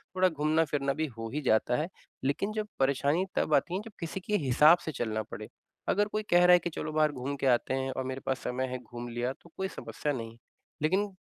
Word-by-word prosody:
थोड़ा 185 Hz, 0 st, +4 dB
घूमना 155 Hz, 0 st, +2 dB
फिरना 140 Hz, -2 st, 0 dB
भी 160 Hz, -, +2 dB
हो 115 Hz, 0 st, -4 dB
ही 150 Hz, -, -1 dB
जाता 110 Hz, +3 st, +3 dB
है। 165 Hz, -, -3 dB, 0.3 s
लेकिन 145 Hz, +10 st, 0 dB
जब 215 Hz, -1 st, -2 dB
परेशानी 140 Hz, +6 st, +2 dB
तब -, -, +1 dB
आती 175 Hz, -, +3 dB
है 195 Hz, -, -1 dB
जब 225 Hz, -, -9 dB
किसी 170 Hz, +3 st, -4 dB
के 210 Hz, +3 st, -1 dB
हिसाब 150 Hz, +7 st, +7 dB
से 155 Hz, -, -2 dB
चलना 110 Hz, -5 st, -2 dB
पड़े। -, -, -8 dB, 0.4 s
अगर 205 Hz, +1 st, +3 dB
कोई 215 Hz, +1 st, -2 dB
कह 175 Hz, 0 st, +6 dB
रहा 180 Hz, -, +8 dB
है 180 Hz, -, +7 dB
कि 175 Hz, -, -3 dB
चलो 155 Hz, -1 st, -4 dB
बाहर 155 Hz, -1 st, +3 dB
घूम 135 Hz, +1 st, -4 dB
के -, -, 0 dB
आते 125 Hz, 0 st, +2 dB
हैं 135 Hz, 0 st, -1 dB
और 130 Hz, -, -3 dB
मेरे 130 Hz, +1 st, -4 dB
पास 135 Hz, -, 0 dB
समय 130 Hz, +1 st, -1 dB
है, 130 Hz, 0 st, -3 dB
घूम 120 Hz, -1 st, -8 dB
लिया 120 Hz, +2 st, -2 dB
तो 170 Hz, -, -17 dB
कोई 190 Hz, -, -1 dB
समस्या 150 Hz, -5 st, -4 dB
नहीं। 115 Hz, -2 st, -6 dB, 0.4 s
लेकिन 195 Hz, +6 st, +1 dB
145 Hz, 240 wpm, -30 LUFS, 130-175 Hz, 0.4 s, रहा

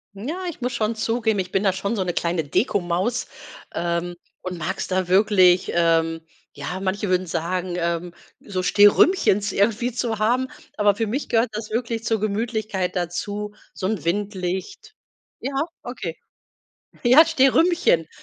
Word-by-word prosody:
Ja, 315 Hz, -, -5 dB
ich 315 Hz, -6 st, -6 dB
muss 250 Hz, 0 st, -2 dB
schon 220 Hz, -1 st, -1 dB
zugeben, 225 Hz, -2 st, 0 dB
ich 185 Hz, -, -3 dB
bin 195 Hz, +1 st, +1 dB
da 190 Hz, -2 st, +3 dB
schon 200 Hz, +4 st, -2 dB
so 195 Hz, -, 0 dB
'ne 175 Hz, -2 st, -2 dB
kleine 170 Hz, -1 st, 0 dB
Dekomaus, 190 Hz, -, 0 dB, 0.5 s
ähm, 170 Hz, 0 st, -2 dB, 0.3 s
und 180 Hz, -2 st, -5 dB
mag's 185 Hz, +4 st, -3 dB
da 185 Hz, -1 st, 0 dB
wirklich 185 Hz, -2 st, +4 dB
ähm, 165 Hz, -1 st, +2 dB, 0.3 s
ja, 145 Hz, +6 st, -5 dB
manche 195 Hz, +1 st, -2 dB
würden 185 Hz, 0 st, +1 dB
sagen, 175 Hz, +2 st, -2 dB
ähm, 170 Hz, 0 st, -2 dB, 0.3 s
so 190 Hz, -3 st, -4 dB
Stehrümchens 205 Hz, -, +4 dB
irgendwie 225 Hz, +4 st, +1 dB
zu 230 Hz, -2 st, -2 dB
haben, 250 Hz, +4 st, +1 dB, 0.3 s
aber 205 Hz, -1 st, +4 dB
für 225 Hz, +2 st, -2 dB
mich 260 Hz, +8 st, -3 dB
gehört 230 Hz, +1 st, +2 dB
das 215 Hz, 0 st, -5 dB
wirklich 230 Hz, 0 st, -2 dB
zur 225 Hz, -2 st, 0 dB
Gemütlichkeit 215 Hz, -3 st, -2 dB
dazu, 205 Hz, +4 st, -3 dB, 0.2 s
so 185 Hz, -, -3 dB
'n 210 Hz, -5 st, -2 dB
Windlicht 190 Hz, -, -3 dB, 0.5 s
ja, 270 Hz, -, -4 dB, 0.3 s
okay. 190 Hz, -9 st, -6 dB, 0.9 s
Ja, 265 Hz, +7 st, +7 dB
Stehrümchen, 320 Hz, -, +3 dB
200 Hz, 150 wpm, -23 LUFS, 180-230 Hz, 0.9 s, Ja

